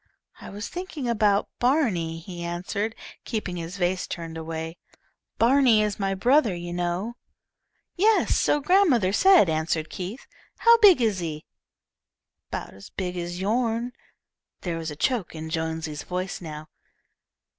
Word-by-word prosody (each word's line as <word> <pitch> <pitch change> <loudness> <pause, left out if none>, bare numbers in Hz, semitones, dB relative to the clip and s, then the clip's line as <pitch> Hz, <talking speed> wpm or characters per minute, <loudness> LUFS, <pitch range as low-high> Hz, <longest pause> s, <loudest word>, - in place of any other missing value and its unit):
"I - - -9
was 205 +2 -6
thinking 350 -7 -5
about 210 -3 +2
Barney," 225 - +1
he 175 +1 -8
answered, 195 +6 -3 0.3
keeping 200 -5 -3
his 170 +3 -6
face 180 0 0
turned 165 -1 -6
away. 160 +1 -5 0.6
"Barney 240 -2 +5
is 210 -1 -2
my 195 -1 0
brother, 240 0 +3
you 175 0 -6
know." 175 +7 -2 0.8
"Yes, 425 +4 +3
so 295 - +2
grandmother 290 - +3
said," 375 - +6
answered 160 0 -1
Keith. 190 +8 -6 0.3
"How 465 0 +6
big 380 - +7
is 210 -4 +1
he?" 155 -3 -5 1.0
"'Bout - - -5
as 100 +1 -13
big 180 -1 -4
as 175 0 -4
yourn." 230 +4 0 0.7
There 170 -2 -3
was 165 -1 -4
a 150 - -6
choke 210 - -1
in 160 0 -6
Jonesy's 160 -2 -3
voice 185 +2 -4
now. 155 -2 -8
190 Hz, 140 wpm, -25 LUFS, 165-235 Hz, 1.0 s, big